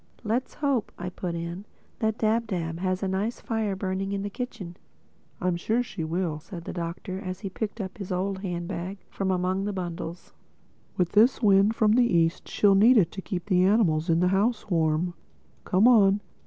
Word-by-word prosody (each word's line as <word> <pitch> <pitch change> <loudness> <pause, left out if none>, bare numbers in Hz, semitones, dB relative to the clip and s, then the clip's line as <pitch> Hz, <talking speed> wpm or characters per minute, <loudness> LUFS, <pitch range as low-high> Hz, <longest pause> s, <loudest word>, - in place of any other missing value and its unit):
"Let's 235 +4 -1
hope," 275 -7 0
I 180 - -4
put 180 -1 -4
in, 170 +4 -5 0.3
"that 220 0 0
Dab 225 +1 +1
Dab 165 -4 -3
has 185 +1 -1
a - - +1
nice 195 +5 -2
fire 220 -3 -2
burning 190 +1 -2
in 200 0 -2
the 205 - -4
kitchen." 215 -8 -6 0.6
"I'm 180 -1 0
sure 225 +7 0
she 195 -8 -6
will," 165 -1 -2
said 170 +1 -9
the - - -5
Doctor 180 +2 -5
as 185 -2 -6
he 195 -3 -5
picked 220 +3 -4
out 190 -2 -5
his 195 -2 -6
old 190 +1 -1
handbag 180 0 -4
from 195 -1 -2
among 185 +1 0
the 205 - -2
bundles—"With 175 0 -6
this 235 +4 +4
wind 200 +1 +5
from 215 -2 +3
the 245 +3 +5
East 165 +1 +1
she'll 205 -1 +3
need 225 +6 +6
it 175 -5 +3
to 195 - -6
keep 180 -3 -4
the 185 -3 +3
animals 185 -5 +3
in 165 +1 +3
the 180 - +3
house 210 +2 0
warm. 165 +1 +1 0.5
Come 200 +4 +4
on. 205 -4 +5
190 Hz, 190 wpm, -26 LUFS, 175-210 Hz, 0.6 s, need